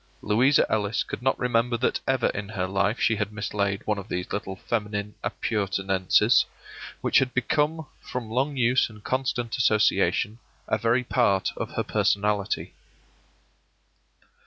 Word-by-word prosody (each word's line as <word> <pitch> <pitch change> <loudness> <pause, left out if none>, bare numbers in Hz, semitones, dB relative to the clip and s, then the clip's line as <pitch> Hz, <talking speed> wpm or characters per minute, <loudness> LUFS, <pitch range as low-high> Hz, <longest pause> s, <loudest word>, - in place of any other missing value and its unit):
Louisa 125 +7 +4
Ellis 105 0 0
could - - -6
not 130 +1 +1
remember 120 -1 +1
that 125 - 0
ever 130 -2 +2
in 105 0 -5
her 95 -4 -2
life 100 +4 0
she 110 -1 +2
had 105 0 -2
mislaid 100 -1 -2
one 105 -1 0
of 100 - -9
these 90 -3 -4
little 95 -2 -3
feminine 105 0 -3
appurtenances, 95 -3 +2 0.6
which - - +4
had 130 -1 -1
become, 150 +4 0 0.2
from 120 -3 -6
long 135 +4 0
use 125 0 +3
and 105 -1 -14
constant 130 -3 -1
association, 110 -1 +2 0.3
a - - 0
very 120 +2 +2
part 115 -6 +1
of - - -5
her - - 0
personality. 105 0 0
110 Hz, 140 wpm, -26 LUFS, 100-125 Hz, 0.6 s, Louisa